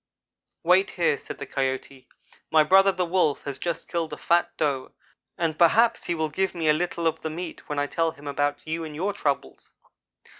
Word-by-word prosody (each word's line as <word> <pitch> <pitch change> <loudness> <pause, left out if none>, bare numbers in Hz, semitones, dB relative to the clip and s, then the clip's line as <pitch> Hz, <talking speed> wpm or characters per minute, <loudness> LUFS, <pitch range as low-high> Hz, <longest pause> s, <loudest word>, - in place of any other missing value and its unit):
"'Wait 185 +3 +4
here,' 165 -4 +3
said - - -9
the 140 - -6
Coyote, 130 -1 -3 0.4
'my 160 -1 +5
brother 195 +4 +6
the 185 -1 -1
Wolf 170 -4 +1
has 140 -2 -5
just 170 -2 -3
killed 165 -2 -2
a - - -5
fat 170 +1 +2
Doe, 140 -4 -1 0.4
and 165 -2 -1
perhaps 230 +7 +4
he 175 - -1
will 160 -1 -1
give 190 +5 -1
me 165 -2 -1
a 150 - +6
little 170 +1 -2
of 160 0 0
the 160 - -3
meat 165 +1 -7
when 150 - -3
I 145 - +1
tell 165 +3 0
him 145 -2 -12
about 145 0 -1
you 160 +1 -3
and 155 -2 -7
your 190 +6 -1
troubles.' 145 -6 -3
160 Hz, 200 wpm, -25 LUFS, 145-175 Hz, 0.4 s, brother